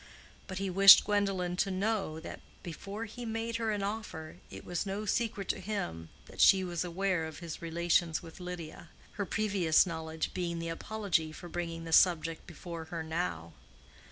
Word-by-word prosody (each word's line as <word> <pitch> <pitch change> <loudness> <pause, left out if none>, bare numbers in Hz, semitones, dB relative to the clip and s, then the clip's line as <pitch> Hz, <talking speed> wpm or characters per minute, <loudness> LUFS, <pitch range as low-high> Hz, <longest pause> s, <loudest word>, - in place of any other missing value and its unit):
But 190 - -6
he 195 0 -2
wished 195 +1 +9
Gwendolen 195 -4 0
to 195 - +1
know 195 -4 -1
that - - -8 0.2
before 200 +6 -6
he 235 +3 -8
made 225 0 -2
her 225 -1 -1
an 205 -2 -1
offer 195 -7 -5
it - - -10
was 175 -2 -2
no 200 +2 -4
secret 210 -2 -1
to - - 0
him 85 - -4 0.2
that - - -5
she 190 -1 +7
was 175 -2 -2
aware 180 -1 -1
of 160 - -9
his 170 -2 -7
relations 170 0 +1
with 165 +2 -11
Lydia, 175 -3 -7 0.2
her 200 -2 -4
previous 195 -7 +3
knowledge 160 -2 -4
being 170 -2 -2
the 165 0 -4
apology 175 -2 -1
for 175 +3 -10
bringing 165 -1 -4
the 165 -1 -5
subject 165 -2 +3
before 170 0 -7
her 165 0 -5
now. 160 - -3
175 Hz, 175 wpm, -31 LUFS, 165-200 Hz, 0.2 s, wished